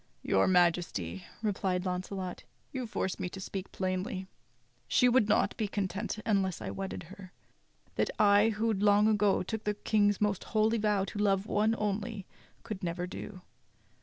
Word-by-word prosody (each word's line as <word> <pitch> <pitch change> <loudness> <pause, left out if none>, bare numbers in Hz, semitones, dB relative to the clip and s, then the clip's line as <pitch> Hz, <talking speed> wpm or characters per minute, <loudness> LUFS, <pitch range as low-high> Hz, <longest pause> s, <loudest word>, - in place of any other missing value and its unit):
"Your 95 - +3
Majesty," 165 - +1 0.2
replied 190 -3 0
Launcelot, 185 0 -4 0.3
"you 255 -3 -4
force 190 -3 -2
me 180 - -2
to 190 - -8
speak 190 0 -6
plainly. 185 0 -2 0.6
She 250 - +4
would 240 -3 +4
not 210 - +2
be 215 - 0
content 200 +2 -3
unless 195 -4 +1
I - - -5
wedded 195 -1 -5
her. 185 +2 -12 0.7
That - - +2
I, 205 +1 +5
who 220 +1 0
long 205 +1 +4
ago 210 -3 +3
took 220 +4 -4
the 210 0 -1
King's 205 -1 +2
most 205 -2 0
holy 220 +1 +3
vow 210 -2 +2
to 205 - -6
love 195 -1 +2
one 215 +1 +2
only, 210 0 -2 0.4
could 215 -4 -6
never 175 0 -2
do. 185 +1 -8
200 Hz, 160 wpm, -31 LUFS, 185-210 Hz, 0.7 s, I